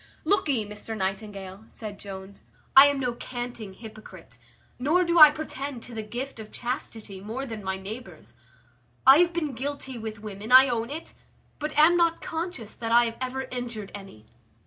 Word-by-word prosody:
"Lookee, 290 - +2
Mr 210 +2 -7
Nightingale," 195 0 -4
said 210 -3 -8
Jones, 195 0 -9 0.3
"I 270 +2 +11
am 285 -1 0
no 250 -2 -1
canting 240 -5 -6
hypocrite, 215 - -12 0.4
nor 310 +8 +3
do 340 -1 +2
I 305 -1 +12
pretend 280 -4 -6
to 245 - -11
the 220 - -4
gift 240 +4 -6
of 215 -1 -9
chastity, 225 -5 -5
more 230 +7 -5
than 225 -5 -7
my 190 0 -2
neighbours. 215 +6 -9 0.7
I 270 +3 +9
have 350 0 +4
been 315 -5 -2
guilty 265 0 -5
with 220 -1 -6
women, 210 +2 -8
I 260 +1 +9
own 235 -1 -1
it; 315 +3 -7 0.5
but 300 0 -4
am 325 +3 +6
not 335 -1 +3
conscious 325 - -5
that 230 -1 -5
I 240 +1 +6
have 230 0 -4
ever 260 +1 -2
injured 235 -5 -5
any. 195 - -11
235 Hz, 170 wpm, -26 LUFS, 210-275 Hz, 0.7 s, I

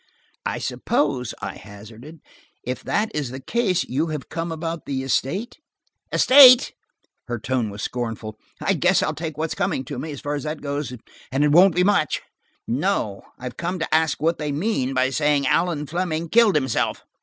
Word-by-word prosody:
"I - - -2
suppose," 135 -5 -1
I 100 -1 -5
hazarded, 110 - -12 0.4
"if 125 +1 -4
that 215 +1 0
is 145 -4 -2
the 130 +2 -7
case, 190 - 0
you 145 +6 -1
have 150 -4 -5
come 165 +1 -4
about 165 0 -5
the 135 -1 -2
estate." 175 - -2 0.5
"Estate!" 255 -2 +8 0.5
Her 120 -1 -3
tone 120 0 -1
was 100 0 -7
scornful. 115 -3 -4 0.2
"I - - +1
guess - - +3
I'll - - -1
take 160 -2 -6
what's 160 0 -2
coming 195 -9 -1
to 135 -1 -6
me, 155 - -5
as 140 - -8
far 145 - -3
as 145 - -2
that 155 +1 -4
goes–and 140 -1 -4
it 150 - +3
won't 180 +3 +6
be 180 - +3
much. 195 -6 +1 0.4
No, 125 - -1 0.2
I 125 0 -6
came 175 +9 -4
to 165 - -3
ask 160 -1 +2
what 165 +3 0
they 150 -1 -2
mean 140 - -1
by 130 +1 +2
saying 145 -1 +1
Allan 165 0 +1
Fleming 170 0 -2
killed 225 -3 +5
himself." 130 -5 0
150 Hz, 180 wpm, -23 LUFS, 130-170 Hz, 0.5 s, Estate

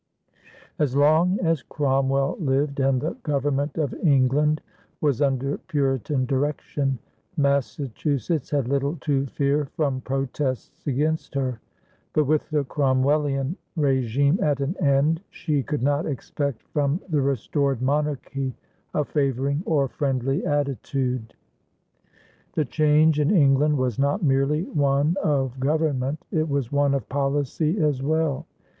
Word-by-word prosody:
As 140 -4 +1
long 160 +6 +4
as 165 -4 +1
Cromwell 135 -1 0
lived 140 -2 0
and 135 -1 +2
the 155 +5 -3
Government 145 0 -1
of 145 -6 -1
England 145 +1 +3 0.4
was 145 -3 +1
under 135 0 0
Puritan 135 -2 0
direction, 135 0 -1 0.4
Massachusetts 140 0 0
had 140 -4 0
little 140 +3 0
to 140 -2 0
fear 140 +2 0
from 140 -4 0
protests 135 +1 -3
against 150 +3 -1
her; 130 -4 -1 0.5
but, 155 - +3
with 150 +2 0
the 150 -2 +1
Cromwellian 135 +2 +1 0.2
régime 140 - +2
at 145 -3 +1
an 140 +6 -1
end, 145 +4 +3
she 150 -4 -1
could 145 -1 -3
not 145 +3 +1
expect 140 -2 -3
from 145 +2 +1
the 155 -5 +1
restored 140 0 0
monarchy 135 -1 -1 0.4
a 150 - +1
favoring 140 0 0
or 145 -4 +2
friendly 135 0 -1
attitude. 135 -4 -1 1.2
The 155 - +1
change 155 +2 +3
in 150 0 +2
England 150 -4 +4
was 130 -3 -1
not 145 +8 +1
merely 140 +2 +2
one 145 -1 +1
of 135 -4 0
government; 145 -1 0
it 160 -4 0
was 140 -4 -1
one 145 -1 +2
of 135 -6 -3
policy 145 +5 0
as 150 -5 +1
well. 155 -1 0
140 Hz, 125 wpm, -24 LUFS, 135-150 Hz, 1.2 s, long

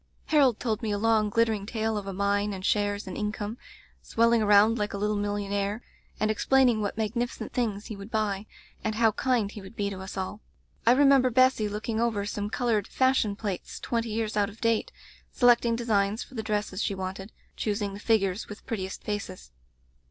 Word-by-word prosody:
"Harold 275 -7 +3
told 220 -3 -1
me 225 - -2
a 205 - 0
long, 215 0 +2
glittering 225 -2 +1
tale 220 -1 -1
of 205 -1 -4
a - - -3
mine 200 +1 0
and 190 -1 -6
shares 205 0 +1
and 185 - -6
income, 210 +2 -3 0.4
swelling 230 0 +2
around 210 +2 +5
like 210 -1 -2
a - - -3
little 210 +1 0
millionaire, 205 +1 -2 0.4
and 215 +1 +2
explain 265 +4 +3
ing 220 -3 0
what 205 0 -3
magnificent 235 +3 -2
things 220 -5 -1
he 215 - -6
would 200 +1 -9
buy, 215 -2 -1 0.4
and 220 -1 -1
how 225 0 +4
kind 235 -3 0
he 210 - -9
would 190 +4 -12
be 200 -2 -1
to 190 - -6
us 190 +1 -7
all. 190 +3 -4 0.5
I 235 - +8
remember 275 -1 +5
Bessy 255 -3 +3
looking 215 +2 -3
over 220 -4 0
some 205 0 -3
colored 225 -3 0
fashion 260 -6 +2
plates 200 -3 -5
twenty 230 -1 -2
years 220 0 -2
out 205 0 +2
of 220 +1 -14
date, 230 -1 +1 0.4
selecting 240 -1 +4
designs 215 -2 0
for - - -17
the 225 - -3
dresses 210 -2 -2
she 200 - -1
wanted; 190 +2 -5 0.2
choosing 205 -2 -2
the 200 - -8
figures 205 -3 +1
with 205 - -10
prettiest 190 -4 -4
faces. 200 - -5
215 Hz, 195 wpm, -27 LUFS, 200-230 Hz, 0.5 s, I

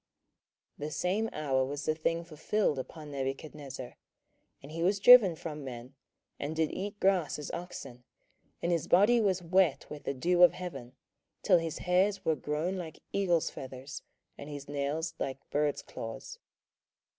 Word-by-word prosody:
27:004:033 150 - -3
The - - -7
same 205 +5 0
hour 135 -4 0
was 140 +2 -4
the 155 - +2
thing 165 +2 -1
fulfilled 160 0 0
upon 150 +3 -8
Nebuchadnezzar: 135 -1 -5 0.7
and 140 - -10
he 165 +1 -4
was 195 +4 +2
driven 210 -5 +9
from 150 -2 -6
men, 125 0 -8 0.5
and 150 +3 -3
did 160 -1 +1
eat 205 +1 -5
grass 190 -5 +2
as 150 - -6
oxen, 135 -8 -7 0.6
and 170 - +1
his 170 -3 0
body 215 +6 +5
was 190 -4 +1
wet 180 -3 +3
with 150 - -8
the 140 - -2
dew 175 +7 +2
of 180 - +8
heaven, 170 -9 -7 0.5
till 180 -4 +5
his 165 -2 -4
hairs 185 +3 +1
were 160 - +3
grown 150 +6 -2
like 165 -4 -6 0.2
eagles' 175 -5 +2
feathers, 130 +1 -8 0.4
and 140 - -8
his 145 -1 -7
nails 145 +4 -2
like 135 0 -4
birds' 145 0 0
claws. - - -7
160 Hz, 160 wpm, -31 LUFS, 140-180 Hz, 0.7 s, driven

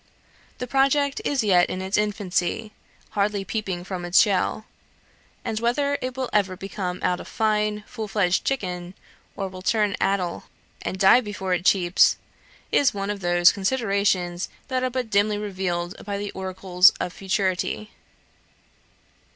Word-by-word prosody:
The 250 - -4
project 275 +2 +2
is 275 -4 0
yet 180 -4 +4
in 185 - -3
its 190 +1 -2
infancy, 210 0 -1 0.4
hardly 200 -1 0
peeping 195 -6 -3
from 180 -1 -5
its 175 +1 +4
shell; 210 +1 +2 0.8
and 215 - -2
whether 280 +5 0
it 255 0 -4
will 260 -1 -1
ever 195 -3 +1
come 190 -2 -4
out 180 0 +1
a - - -7
fine 210 -1 0
full 220 -3 -6
fledged 195 -3 +1
chicken, 180 -8 -3 0.4
or 195 - -2
will 185 -1 -9
turn 210 +1 +1
addle 190 -3 0 0.4
and 185 - -4
die 195 +6 +6
before 200 -4 -3
it 180 0 -1
cheeps, 180 -2 +4 0.5
is 275 -6 +3
one 200 +1 -2
of 205 - -5
those 175 -1 +5
considerations 195 -5 0 0.2
that 255 -1 0
are 255 - +1
but 250 -3 -3
dimly 205 +1 +2
revealed 185 -4 -3
by 200 0 -3
the 205 0 -4
oracles 185 -1 +3
of 180 - -3
futurity. 195 +2 -1
200 Hz, 150 wpm, -24 LUFS, 185-215 Hz, 0.8 s, die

